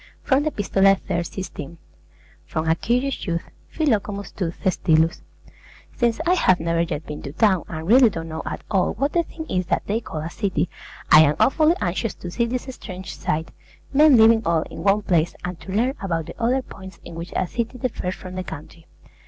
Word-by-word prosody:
From 265 0 +3
the 310 - 0
'Epistolae,' 195 -5 +3
iii. 175 0 +1
16. 170 -3 -7 0.7
FROM 160 +1 -2
A 160 - +5
CURIOUS 250 +6 -1
YOUTH 170 -1 -1 0.3
PHILOCOMUS 210 -9 -1
TO 180 -4 -2
THESTYLUS 165 -2 +1 0.7
Since 235 -1 +1
I 350 - +4
have 185 - +3
never 165 0 0
yet 165 -2 -3
been 150 - -7
to 140 - -6
town, 190 +2 +2
and 160 -1 -6
really 245 +3 +7
don't 165 -5 -6
know 160 0 -5
at - - -5
all 190 -3 +2
what 275 +7 -1
the 345 - +3
thing 320 -1 -8
is 180 -1 -1
that - - 0
they 220 +3 -1
call 155 - -6
a 160 - -4
city, 180 -6 -1 0.4
I 155 - +10
am 150 -1 +4
awfully 310 +4 +4
anxious 185 +4 -1
to 175 - -8
see 235 +5 0
this 250 +1 -2
strange 190 -5 -8
sight, 160 +2 -2 0.4
men 295 -1 +7
living 225 0 +6
all 165 -4 +1
in - - -9
one 200 +3 +2
place, 170 -3 +1
and 180 -1 -5
to 190 - -9
learn 235 +7 +1
about 165 -5 -2
the - - -9
other 255 +3 +2
points 190 -4 -12
in - - -9
which 170 +2 -7
a 185 - +1
city 235 +6 -3
differs 220 -7 -3
from 185 -1 -9
the 185 0 -4
country. 160 0 -10
190 Hz, 200 wpm, -23 LUFS, 165-235 Hz, 0.7 s, I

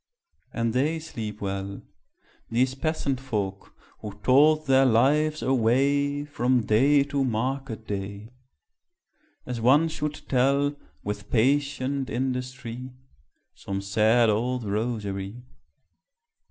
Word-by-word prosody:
And 115 -1 -1
they 145 +6 +1
sleep 110 -10 -7
well 100 0 -4 0.7
These 125 +3 +1
peasant 140 -2 -2
folk, 100 -7 -4 0.2
who 105 -2 -7
told 150 +5 +5
their 135 -1 +5
lives 150 +6 +2
away, 140 +4 +2
From 125 -4 +1
day 140 +6 +4
to 140 -1 -1
market 125 -1 -2
day, 100 +2 -5 1.1
As 125 -2 -4
one 145 +7 +4
should 150 -1 -4
tell, 140 +2 +2 0.3
With 105 0 -5
patient 140 +2 +1
industry, 125 0 -4 0.6
Some 95 0 -5
sad 110 +4 +3
old 120 +3 -1
rosary. 105 0 -3
125 Hz, 100 wpm, -26 LUFS, 110-140 Hz, 1.1 s, told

